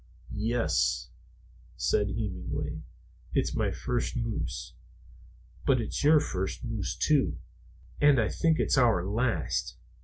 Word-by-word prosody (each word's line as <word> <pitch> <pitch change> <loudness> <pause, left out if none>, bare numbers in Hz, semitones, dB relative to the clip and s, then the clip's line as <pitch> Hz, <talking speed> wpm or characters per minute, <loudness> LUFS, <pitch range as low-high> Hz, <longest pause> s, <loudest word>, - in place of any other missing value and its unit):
"Yes," 110 - 0 0.7
said 105 - +2
Hemenway, 100 - -4 0.5
"it's - - +1
my - - +1
first 120 -1 -2
moose. 110 - -3 0.9
But 130 -2 +3
it's 115 - -3
your 150 +1 +7
first 95 -7 -3
moose, 115 -4 -3
too. 150 -3 +2 0.6
And 145 -3 +6
I 110 - +2
think 165 -1 +2
it's - - +3
our 110 -8 +3
last. 110 -4 -1
115 Hz, 115 wpm, -29 LUFS, 95-130 Hz, 0.9 s, your